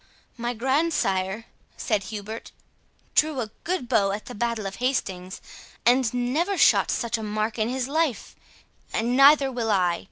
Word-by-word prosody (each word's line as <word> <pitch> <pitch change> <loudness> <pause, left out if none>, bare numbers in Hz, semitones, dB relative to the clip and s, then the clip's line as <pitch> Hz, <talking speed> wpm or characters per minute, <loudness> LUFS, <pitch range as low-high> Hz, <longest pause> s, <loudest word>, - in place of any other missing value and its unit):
"My 240 0 -3
grandsire," 230 - 0 0.3
said 210 -4 -1
Hubert, 215 +1 -7 0.6
"drew 305 -3 +2
a 220 -3 -4
good 345 -8 -2
bow 200 -3 +2
at 210 - -5
the 245 - -8
battle 230 -1 -2
of 195 0 -5
Hastings, 190 -8 -2 0.5
and 245 0 +4
never 285 +11 0
shot - - +5
at - - -13
such 235 -1 -1
a - - -5
mark 215 +1 -2
in 220 +1 +1
his 255 0 -2
life—and 255 -4 -3
neither 275 0 +6
will 235 -3 -2
I. 180 -4 +2
235 Hz, 155 wpm, -25 LUFS, 215-265 Hz, 0.6 s, neither